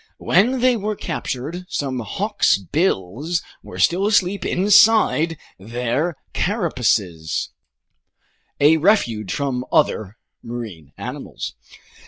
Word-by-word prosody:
When 240 +8 +2
they 255 -1 +4
were 215 -1 -2
captured, 165 0 -5
some 135 -3 -2
hawksbills 155 - 0 0.2
were - - -10
still 190 +4 +2
asleep 195 -2 +2
inside 190 -4 +4 0.2
their 125 - -2 0.2
carapaces, 115 - 0 1.1
a 150 +3 +6
refuge 120 - +2
from 130 -1 -2
other 110 - +1 0.2
marine 110 - -8
animals. - - -6
155 Hz, 90 wpm, -21 LUFS, 115-190 Hz, 1.1 s, a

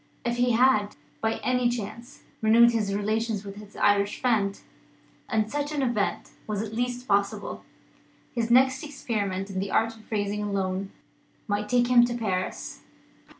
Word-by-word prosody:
If 240 0 0
he 245 0 +3
had, 225 -4 +3 0.3
by 220 0 +1
any 250 -1 +2
chance, 235 +1 -6 0.2
renewed 230 +2 +6
his 210 -4 0
relations 215 0 -1
with 200 0 -8
his 210 -1 -12
Irish 205 0 +2
friend 210 -6 +1 0.7
and 220 -1 0
such 290 0 -2
an 290 -2 -1
event 235 -5 -1 0.2
was 210 -1 -2
at 220 0 -7
least 245 +2 -2
possible 200 0 0 0.7
his 235 -1 -1
next 260 +2 +4
experiment 205 -9 -3
in 190 - -3
the 195 +1 -2
art 225 +2 +1
of 220 -1 -18
raising 205 -1 -1
a 205 -1 -3
loan 195 0 -1 0.6
might 210 0 -1
take 245 -1 +3
him 245 -1 +6
to 240 0 -3
Paris. 190 -5 -3
220 Hz, 160 wpm, -26 LUFS, 205-240 Hz, 0.7 s, renewed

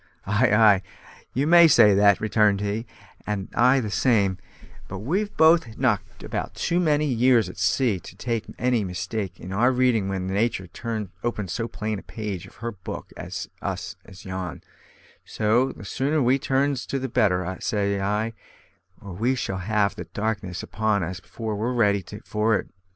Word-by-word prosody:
"Ay, 105 +4 +2
ay! 105 -3 +6 0.5
you 135 +3 +1
may 170 +1 +8
say 115 -9 +6
that," 100 0 +5
returned 105 -2 +2
he, 105 +3 -3 0.4
"and 105 -2 -3
I 130 +3 +4
the 110 -5 -3
same; 100 -4 +2 0.5
but 100 - -6
we've 185 - -2
both 160 -8 +4
knocked 120 -7 -1
about - - -4
too 175 +1 0
many 150 -3 +2
years 125 -5 +3
at 90 - -10
sea 100 +2 +2
to 125 - -12
make 115 -2 0
any 125 -3 +1
mistake 95 0 -4
in 95 - -7
our 120 +6 +3
reading 125 -6 +2
when 95 -1 -2
Natur' 95 -1 -1 0.5
opens 105 -7 -2
so 115 - -2
plain 110 -2 -4
a - - -11
page 105 -6 -6
of - - -18
her 115 - -1
book 95 -5 -8
for - - -7 0.4
us - - -4
as 95 - -14
yon; 95 -2 -5 0.6
so 115 +5 +1
the 100 - -11
sooner 140 +8 0
we 130 0 +3
turns 135 0 0
to 140 - -2
the 130 0 -3
better, 95 -7 +1
say 100 -2 -1
I, 105 +3 -1 0.7
or 100 -2 -9
we 120 +8 0
shall 95 -6 -3
have 100 +1 +1
the - - -7
darkness 105 -4 -3
upon 110 -2 0
us 90 +1 -4
afore 110 +4 -5
we're 115 +5 -1
ready 100 -4 +2 0.2
for 110 +1 +1
it. - - -7
110 Hz, 175 wpm, -24 LUFS, 100-125 Hz, 0.7 s, may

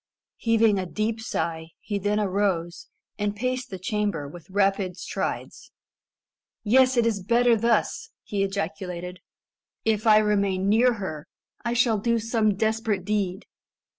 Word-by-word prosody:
Heaving 225 -3 +3
a 185 - -3
deep 220 +4 -2
sigh, 160 -7 -3
he 205 -2 -3
then 205 +2 0
arose, 190 -4 -1 0.3
and 205 0 -1
paced 255 +3 -2
the 190 - -6
chamber 195 -5 -2
with 170 +4 -12
rapid 195 -2 +1
strides. - - -5 0.9
"Yes, 255 +3 +4
it 235 - +4
is 215 -4 0
better 235 +4 +3
thus," 230 0 0
he 200 -1 -2
ejaculated. 180 -2 -3 0.7
"If 220 0 +1
I 215 -1 +8
remain 200 -3 +1
near 235 +4 +4
her, 190 -8 -6 0.4
I 235 0 -1
shall 240 -3 +2
do 235 +3 +1
some 225 -2 +1
desperate 220 -2 0
deed. 195 -3 -1
205 Hz, 135 wpm, -25 LUFS, 190-225 Hz, 0.9 s, I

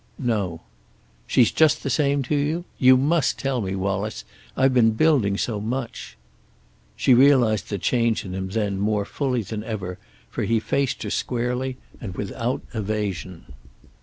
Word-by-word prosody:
"No." 100 -10 -1 0.7
"She's 120 -3 +4
just 155 -1 +3
the - - -2
same 140 0 +2
to 140 +4 -1
you? 155 +5 -1
You 130 0 +7
must 150 +4 +1
tell 135 -3 -1
me, 95 -1 -3
Wallace. 100 +2 -2 0.3
I've 130 0 +3
been 115 -3 +4
building 110 -7 +2
so 110 -1 -2
much." 120 +3 -5 0.8
She 130 - +4
realized 125 -5 +4
the 100 - -2
change 115 +2 +1
in 95 - -6
him 95 0 -3
then 100 -2 -1
more 105 0 0
fully 125 -1 -1
than 105 +2 -5
ever 95 -5 -5 0.3
for - - -5
he 115 0 +2
faced 140 +3 -1
her - - -4
squarely 125 +1 -2 0.2
and 95 -6 -6
without 115 +6 -3
evasion. 100 - -4
115 Hz, 155 wpm, -23 LUFS, 100-130 Hz, 0.8 s, You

